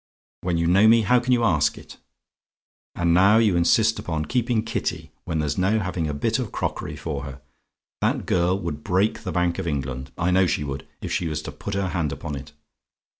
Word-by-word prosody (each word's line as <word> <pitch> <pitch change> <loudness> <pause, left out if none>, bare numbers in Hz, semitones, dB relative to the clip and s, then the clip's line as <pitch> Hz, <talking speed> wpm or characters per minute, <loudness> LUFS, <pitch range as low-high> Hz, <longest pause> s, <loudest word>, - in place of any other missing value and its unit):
When 90 -2 -1
you 85 - +1
know 95 +6 +5
me, 115 0 +6
how 125 +5 +4
can 125 +1 -2
you 120 -2 +3
ask 75 -8 +2
it? - - -12 1.0
"And 85 -1 +2
now 95 +5 +6
you 110 -5 +3
insist 85 0 +3
upon 75 -1 -3
keeping 120 -2 0
Kitty, 80 -8 -3
when 80 -2 -2
there's 75 +3 -1
no 100 +4 +2
having 90 -5 -2
a 75 - -2
bit 70 - 0
of - - -4
crockery - - -3
for 75 -4 -4
her? 70 -1 -8 0.6
That - - 0
girl 90 +2 +1
would 75 -4 -5
break 100 +3 +1
the 95 - -4
Bank 90 +1 0
of 95 - -3
England 65 -3 -3
I 85 +1 +1
know 95 0 +4
she 75 - 0
would 70 -1 -6
if - - -5
she 85 - 0
was 75 -1 -3
to - - -6
put 100 - -6
her 100 -1 -1
hand 80 -5 -1
upon 75 +2 -5
it. 70 +2 -9
85 Hz, 215 wpm, -24 LUFS, 75-100 Hz, 1.0 s, me